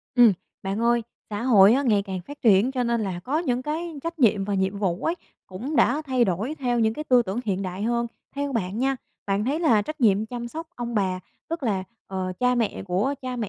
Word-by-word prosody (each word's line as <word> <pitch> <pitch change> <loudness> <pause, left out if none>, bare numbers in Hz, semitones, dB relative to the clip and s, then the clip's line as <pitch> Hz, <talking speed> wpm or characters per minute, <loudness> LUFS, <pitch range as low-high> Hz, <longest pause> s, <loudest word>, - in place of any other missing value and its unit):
Ừm, 240 -3 +7 0.3
bạn 195 +3 -2
ơi, 235 0 +3 0.3
xã 205 +1 -3
hội 215 -5 +7
á 275 - +2
ngày 215 -7 +3
càng 190 -2 -5
phát 285 +11 -11
triển 215 +2 +5
cho 255 -2 0
nên 235 -1 +1
là 185 -4 -3
có 290 +4 0
những 255 -7 -1
cái 315 +2 -4
trách 335 0 -4
nhiệm 210 -6 +3
và 205 0 -1
nhiệm 190 +1 0
vụ 185 -3 -1
ấy 330 - +1 0.3
cũng 240 +11 -5
đã 300 - +3
thay 260 -4 +2
đổi 205 - -1
theo 245 -3 0
những 220 0 +2
cái 305 - -5
tư 250 -4 +5
tưởng 205 +3 -3
hiện 195 -2 -1
đại 185 +1 -4
hơn. 235 +1 0 0.3
Theo 285 0 -2
bạn 205 -3 -2
nha, 270 +2 +1 0.3
bạn 200 +1 0
thấy 285 +7 0
là 230 -11 +4
trách 310 +7 -7
nhiệm 215 -2 +3
chăm 240 +1 -5
sóc 325 +6 -6
ông 240 -1 -4
bà, 190 -3 0 0.3
tức 330 -1 -4
là, 200 -6 0 0.2
ờ, 185 -1 -3
cha 250 0 +3
mẹ 235 -3 -1
của 195 +10 0
cha 255 -1 -4
mẹ 225 -4 -3
235 Hz, 240 wpm, -25 LUFS, 195-260 Hz, 0.3 s, Ừm